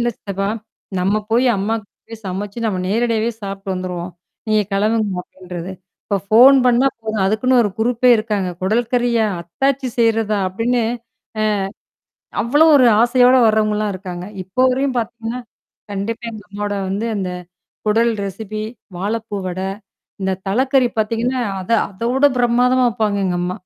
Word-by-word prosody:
இல்ல 240 Hz, 0 st, +1 dB
சித்தப்பா 195 Hz, 0 st, -3 dB, 0.5 s
நாம் 195 Hz, +4 st, +1 dB
போய் 250 Hz, +3 st, +4 dB
அம்மா 205 Hz, +4 st, 0 dB, 0.3 s
போய் 225 Hz, -1 st, -9 dB
சமைத்து 200 Hz, +5 st, -4 dB
நாம் 185 Hz, -4 st, -1 dB
நேரடியாகவே 230 Hz, +2 st, +1 dB
சாப்பிட்டுட்டு 195 Hz, -1 st, -4 dB
வந்துடுவோம், 180 Hz, -1 st, -4 dB, 0.4 s
நீங்க 215 Hz, -1 st, +3 dB
கிளம்புங்க 210 Hz, -1 st, +1 dB
அப்படின்னு 185 Hz, 0 st, -18 dB
சொல்து. 175 Hz, +2 st, -5 dB, 0.3 s
இப்போ 200 Hz, -, 0 dB, 0.2 s
போன் 260 Hz, +5 st, +8 dB
பண்ணினால் 250 Hz, +2 st, +3 dB
போதும், 220 Hz, -2 st, -3 dB
அதுக்குன்னு 230 Hz, +6 st, +2 dB
ஒரு 205 Hz, -, 0 dB
குருப்பே 245 Hz, +2 st, +3 dB
இருக்காங்க. 210 Hz, -4 st, -1 dB
குடல் 225 Hz, +5 st, +1 dB
கறியா? 240 Hz, -2 st, +2 dB, 0.2 s
அத்தாச்சி 265 Hz, +9 st, -1 dB
செய்றதா? 225 Hz, -2 st, +2 dB
அப்படின்னு. 235 Hz, +5 st, 0 dB, 1.6 s
அவ்வளவு 300 Hz, +6 st, +5 dB
ஒரு 255 Hz, -, +6 dB
ஆசையோடு 250 Hz, +1 st, +5 dB
வருவங்கல்லாம் 215 Hz, -1 st, +1 dB
இருக்காங்க. 180 Hz, -2 st, -6 dB, 0.2 s
இப்போ 190 Hz, +7 st, -4 dB
வரையிலும் 265 Hz, 0 st, 0 dB
பாத்தீவ்கனா, 230 Hz, +1 st, -4 dB, 0.5 s
கண்டிப்பா 220 Hz, +4 st, -4 dB
இந்த 215 Hz, -, -9 dB
அம்மாவுடைய 205 Hz, 0 st, -3 dB
வந்து 205 Hz, +4 st, -2 dB
அந்த 185 Hz, -2 st, -2 dB, 0.6 s
குடல் 230 Hz, +2 st, +3 dB
ரெசெப்பி 215 Hz, +2 st, -5 dB, 0.3 s
வாழைப்பூ 210 Hz, +3 st, -3 dB
வடை, 185 Hz, +1 st, -3 dB, 0.5 s
இந்தத் 190 Hz, 0 st, -2 dB
தலைக்கறி 260 Hz, +3 st, +2 dB
பாத்தீங்கனா, 230 Hz, +4 st, 0 dB, 0.2 s
அத 185 Hz, -, -8 dB, 0.2 s
அதவிடப் 250 Hz, +7 st, +1 dB
பிரமாதமா 250 Hz, +1 st, +3 dB
வைப்பாங்க 215 Hz, -3 st, -1 dB
எங்க 175 Hz, -1 st, -1 dB
அம்மா. 180 Hz, +1 st, -1 dB
220 Hz, 135 wpm, -19 LUFS, 195-240 Hz, 1.6 s, போன்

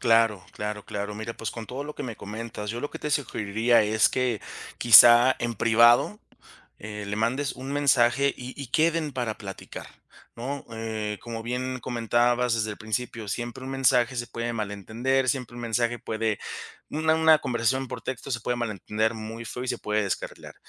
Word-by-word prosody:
Claro, 115 Hz, -5 st, +3 dB
claro, 105 Hz, 0 st, -5 dB
claro. 100 Hz, 0 st, -4 dB
Mira, 110 Hz, +2 st, -5 dB
pues, 115 Hz, -, -4 dB
con 115 Hz, -2 st, -7 dB
todo 130 Hz, +3 st, -5 dB
lo 150 Hz, +1 st, -7 dB
que -, -, -6 dB
me 115 Hz, -4 st, -6 dB
comentas, 105 Hz, 0 st, -6 dB
yo 115 Hz, +2 st, -4 dB
lo 145 Hz, -, -4 dB
que -, -, -7 dB
te 150 Hz, -, -3 dB
sugeriría 115 Hz, -4 st, +2 dB
es 110 Hz, +1 st, +3 dB
que 125 Hz, -4 st, -1 dB, 0.4 s
quizá 120 Hz, +2 st, +9 dB
en 120 Hz, 0 st, -1 dB
privado, 120 Hz, -, +4 dB, 0.6 s
eh, 105 Hz, 0 st, -7 dB
le 100 Hz, +1 st, -3 dB
mandes 125 Hz, +6 st, 0 dB
un 135 Hz, +2 st, -6 dB
mensaje 140 Hz, -1 st, +3 dB
y 125 Hz, +1 st, -8 dB
y 135 Hz, -, -6 dB
queden 160 Hz, +1 st, +1 dB
para 120 Hz, -4 st, -3 dB
platicar, 95 Hz, -2 st, -8 dB, 0.5 s
¿no?, 135 Hz, +4 st, -5 dB
eh, 110 Hz, -2 st, -4 dB
como 115 Hz, -1 st, -6 dB
bien 125 Hz, +2 st, -3 dB
comentabas 120 Hz, 0 st, +1 dB
desde 110 Hz, -1 st, -1 dB
el 105 Hz, -, -6 dB
principio, 110 Hz, +1 st, -3 dB
siempre 120 Hz, +4 st, -4 dB
un 130 Hz, -, -5 dB
mensaje 130 Hz, -2 st, +3 dB
se 120 Hz, 0 st, -2 dB
puede 115 Hz, 0 st, -3 dB
malentender, 115 Hz, +5 st, -1 dB
siempre 125 Hz, -3 st, -1 dB
un 120 Hz, -, -7 dB
mensaje 120 Hz, +1 st, 0 dB
puede 110 Hz, -2 st, -2 dB, 0.5 s
una 160 Hz, +1 st, +2 dB
una 160 Hz, -1 st, +6 dB
conversación 125 Hz, +2 st, 0 dB
por -, -, -6 dB
texto 130 Hz, +1 st, -5 dB
se 115 Hz, -3 st, -1 dB
puede 120 Hz, +2 st, -1 dB
malentender 110 Hz, -1 st, -1 dB
muy 110 Hz, +1 st, -7 dB
feo 125 Hz, +3 st, -5 dB
y -, -, -5 dB
se -, -, -1 dB
puede 105 Hz, 0 st, 0 dB
descarrilar. 95 Hz, -, -5 dB
120 Hz, 185 wpm, -26 LUFS, 110-130 Hz, 0.6 s, quizá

